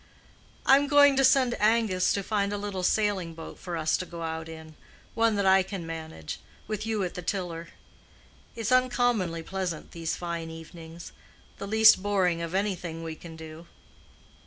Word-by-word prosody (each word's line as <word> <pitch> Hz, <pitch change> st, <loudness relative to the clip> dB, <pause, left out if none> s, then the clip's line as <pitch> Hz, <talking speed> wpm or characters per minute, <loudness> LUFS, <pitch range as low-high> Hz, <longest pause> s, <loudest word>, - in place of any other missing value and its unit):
"I'm 275 Hz, +2 st, +5 dB
going 285 Hz, -1 st, +6 dB
to 270 Hz, -, +4 dB
send 255 Hz, -2 st, +4 dB
Angus 210 Hz, -4 st, +2 dB
to 200 Hz, -, -1 dB
find 200 Hz, -1 st, 0 dB
a 205 Hz, -, -2 dB
little 200 Hz, -2 st, -4 dB
sailing 190 Hz, -4 st, 0 dB
boat 165 Hz, -, -9 dB
for 175 Hz, -2 st, -5 dB
us 155 Hz, -1 st, +1 dB
to 185 Hz, -, -4 dB
go 170 Hz, -1 st, -7 dB
out 160 Hz, 0 st, -4 dB
in; 160 Hz, -1 st, -10 dB, 0.4 s
one 225 Hz, -1 st, +2 dB
that 200 Hz, -1 st, 0 dB
I 190 Hz, 0 st, +6 dB
can 190 Hz, -2 st, -5 dB
manage, 160 Hz, -, -7 dB, 0.3 s
with 215 Hz, 0 st, -4 dB
you 220 Hz, -3 st, 0 dB
at 180 Hz, -, -3 dB
the 180 Hz, -, -6 dB
tiller. 175 Hz, -2 st, -3 dB, 0.9 s
It's 225 Hz, +1 st, -3 dB
uncommonly 245 Hz, -9 st, +2 dB
pleasant 185 Hz, -3 st, -4 dB
these 165 Hz, -1 st, -3 dB
fine 170 Hz, -2 st, -4 dB
evenings—the 165 Hz, +3 st, -11 dB
least 220 Hz, -1 st, +6 dB
boring 185 Hz, -4 st, +1 dB
of 170 Hz, +2 st, -4 dB
anything 180 Hz, -5 st, -2 dB
we 165 Hz, -1 st, -4 dB
can 165 Hz, +1 st, -11 dB
do." 160 Hz, +1 st, -10 dB
185 Hz, 165 wpm, -27 LUFS, 165-210 Hz, 0.9 s, going